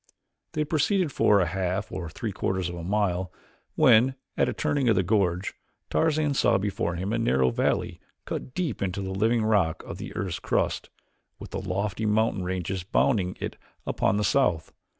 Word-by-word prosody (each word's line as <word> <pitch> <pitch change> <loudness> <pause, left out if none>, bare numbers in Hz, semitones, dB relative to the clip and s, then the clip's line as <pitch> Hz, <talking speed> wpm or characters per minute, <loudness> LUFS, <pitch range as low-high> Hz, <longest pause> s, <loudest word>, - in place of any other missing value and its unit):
They 155 - -1
had 150 - -2
proceeded 170 +2 +2
for 105 -5 +4
a 90 - +3
half 95 +3 -2
or 90 -3 -5
three 110 +6 -4
quarters 95 -2 -1
of - - -6
a 85 - -6
mile 95 -2 0 0.4
when, 130 -3 +5 0.2
at - - +2
a - - 0
turning 140 -4 0
of 110 - +4
the 95 - +2
gorge, 95 -2 +1 0.4
Tarzan 155 -2 +2
saw 120 -4 +3
before 95 -3 -2
him 95 +5 -2
a 115 - +1
narrow 65 - +2
valley - - 0 0.3
cut 130 - -5
deep 165 - -2
into 100 0 -2
the 95 - -4
living 110 +4 +2
rock 100 -8 +2
of - - -8
the - - -7
earth's 95 -4 -3
crust, - - -1 0.5
with - - -10
lofty 100 +3 -2
mountain 105 -2 +2
ranges 90 0 -3
bounding 95 -1 +1
it - - -5 0.3
upon 100 - +1
the 105 - +1
south. 100 -6 +1
100 Hz, 180 wpm, -26 LUFS, 90-115 Hz, 0.5 s, when